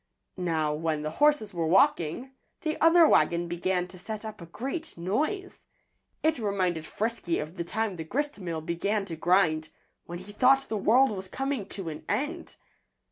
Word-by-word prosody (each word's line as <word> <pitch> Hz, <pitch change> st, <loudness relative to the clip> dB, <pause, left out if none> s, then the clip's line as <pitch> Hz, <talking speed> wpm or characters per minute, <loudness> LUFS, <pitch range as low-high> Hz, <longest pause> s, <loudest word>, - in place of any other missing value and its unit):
Now, 160 Hz, -4 st, 0 dB
when 155 Hz, -1 st, -1 dB
the 155 Hz, -, -2 dB
horses 295 Hz, -9 st, +4 dB
were 165 Hz, -2 st, -1 dB
walking, 180 Hz, -, +2 dB, 0.3 s
the 310 Hz, -1 st, -1 dB
other 330 Hz, 0 st, +7 dB
wagon 170 Hz, -, +3 dB
began 180 Hz, +1 st, -1 dB
to 185 Hz, 0 st, -12 dB
set 215 Hz, +3 st, -6 dB
up 215 Hz, -4 st, -7 dB
a 170 Hz, -, -9 dB
great 275 Hz, -, -5 dB
noise. 310 Hz, -, -2 dB, 0.6 s
It 315 Hz, -3 st, +2 dB
reminded 185 Hz, -6 st, -1 dB
Frisky 220 Hz, -6 st, -2 dB
of 155 Hz, +3 st, -5 dB
the 170 Hz, -, -3 dB
time 215 Hz, +2 st, -2 dB
the 160 Hz, -, -4 dB
gristmill 185 Hz, -, -3 dB
began 195 Hz, +5 st, -1 dB
to 170 Hz, -, -5 dB
grind, 160 Hz, -3 st, +2 dB, 0.4 s
when 175 Hz, -, -5 dB
he 185 Hz, +3 st, -10 dB
thought 265 Hz, +5 st, +4 dB
the 220 Hz, -, -1 dB
world 240 Hz, +6 st, +4 dB
was 190 Hz, -2 st, -5 dB
coming 270 Hz, -2 st, -3 dB
to 190 Hz, -5 st, -6 dB
an 150 Hz, -, -7 dB
end. 325 Hz, +5 st, -2 dB
190 Hz, 170 wpm, -28 LUFS, 170-255 Hz, 0.6 s, other